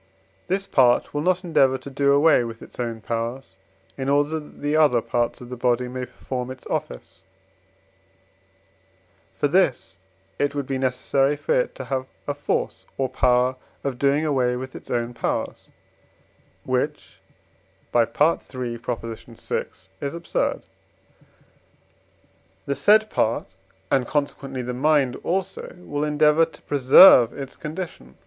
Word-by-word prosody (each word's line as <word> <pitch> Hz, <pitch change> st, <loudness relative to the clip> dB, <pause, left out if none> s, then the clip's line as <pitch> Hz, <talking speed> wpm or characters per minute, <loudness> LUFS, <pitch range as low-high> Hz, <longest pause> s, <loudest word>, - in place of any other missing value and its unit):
This 195 Hz, +2 st, -1 dB
part 125 Hz, -8 st, +3 dB
will 145 Hz, -, -1 dB
not 185 Hz, +3 st, +1 dB
endeavour 135 Hz, -6 st, +3 dB
to 140 Hz, -, -10 dB
do 140 Hz, +1 st, +2 dB
away 145 Hz, -2 st, +5 dB
with 115 Hz, -1 st, -7 dB
its -, -, -14 dB
own 115 Hz, -2 st, -3 dB
powers, 115 Hz, -1 st, -4 dB, 0.4 s
in 135 Hz, +1 st, -2 dB
order 145 Hz, +3 st, +2 dB
that 150 Hz, -, -14 dB
the 145 Hz, +1 st, +1 dB
other 150 Hz, -6 st, +4 dB
parts 120 Hz, +1 st, -2 dB
of 120 Hz, -, -10 dB
the 125 Hz, -, -5 dB
body 125 Hz, 0 st, 0 dB
may 125 Hz, 0 st, -5 dB
perform 125 Hz, -1 st, -5 dB
its 130 Hz, 0 st, -9 dB
office; 75 Hz, +8 st, -5 dB, 2.1 s
for -, -, +1 dB
this 145 Hz, -, +1 dB, 0.4 s
it 145 Hz, 0 st, 0 dB
would 140 Hz, -1 st, -2 dB
be 135 Hz, 0 st, -3 dB
necessary 135 Hz, +2 st, +1 dB
for 475 Hz, -, -1 dB
it -, -, 0 dB
to -, -, -6 dB
have 130 Hz, -1 st, -3 dB, 0.2 s
a 145 Hz, -, 0 dB
force 145 Hz, -, -3 dB
or 135 Hz, -1 st, 0 dB
power 125 Hz, 0 st, +2 dB, 0.3 s
of 135 Hz, -3 st, -3 dB
doing 140 Hz, +3 st, +2 dB
away 130 Hz, -5 st, +1 dB
with 130 Hz, +1 st, -7 dB
its -, -, -11 dB
own 120 Hz, 0 st, -1 dB
powers, 120 Hz, -, -3 dB, 1.0 s
which -, -, -3 dB, 0.8 s
(III. 120 Hz, -1 st, +5 dB
vi.) 120 Hz, -4 st, -2 dB, 0.4 s
is 140 Hz, +3 st, -3 dB
absurd. 170 Hz, 0 st, -2 dB, 2.0 s
The 140 Hz, -, -1 dB
said 215 Hz, +5 st, +4 dB
part, 110 Hz, -, 0 dB, 0.5 s
and, 130 Hz, -3 st, +2 dB
consequently, 135 Hz, -3 st, -2 dB
the 125 Hz, +1 st, -4 dB
mind 140 Hz, 0 st, +2 dB
also, 190 Hz, +1 st, -3 dB
will 145 Hz, -5 st, -4 dB
endeavour 150 Hz, +1 st, +4 dB
to 160 Hz, -, -17 dB
preserve 130 Hz, -2 st, +7 dB
its 135 Hz, -2 st, -8 dB
condition. 155 Hz, -, -7 dB
135 Hz, 140 wpm, -23 LUFS, 125-150 Hz, 2.1 s, preserve